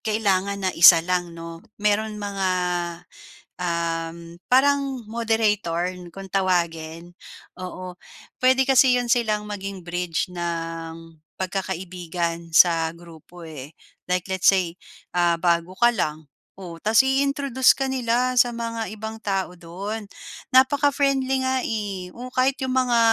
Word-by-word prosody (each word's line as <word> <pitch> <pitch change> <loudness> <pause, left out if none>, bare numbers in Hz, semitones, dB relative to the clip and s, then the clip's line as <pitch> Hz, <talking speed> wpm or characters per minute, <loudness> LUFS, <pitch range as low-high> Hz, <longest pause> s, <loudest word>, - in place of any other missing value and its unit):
kailangan 200 -2 0
na 185 - +2
isa 165 -1 +8
lang, 175 -1 -2
'no, 165 0 -8 0.2
meron 210 +1 0
mga, 200 -2 -2 1.1
uhm, 170 0 -3
parang 270 -1 +2
moderator 210 -6 0 0.2
kung 195 -1 -9
tawagin. 170 -3 -1 0.5
Oo, 185 0 -7 0.5
puwede 260 +1 +4
kasi 265 -1 +5
'yon 245 -1 0
silang 215 -4 +1
maging 195 -3 -6
bridge 175 0 -2
ng 165 -1 -4 0.4
pagkakaibigan 175 -3 -4
sa 165 -2 +5
grupo, 170 0 -14
eh. 150 -2 -10 0.3
Like 180 +1 -1
let's 190 -1 +2
say 180 -3 +2 0.6
bago 170 0 +1
ka 240 - +7
lang, 155 -8 -3 0.3
oh, 175 -3 -8
tapos 215 +7 +3
i-introduce 275 -1 +3
ka 270 0 -3
nila 250 0 0
sa 245 -1 +4
mga 230 -3 -4
ibang 220 +1 -6
tao 190 -3 -2
don, 195 +6 -6 0.5
napaka-friendly 275 0 +3
nga, 260 0 0
eh, 200 -5 -4
o 245 +5 -8
kahit 260 +2 0
'yong 260 -1 -2
mga 250 -2 +3
195 Hz, 120 wpm, -23 LUFS, 170-240 Hz, 1.1 s, isa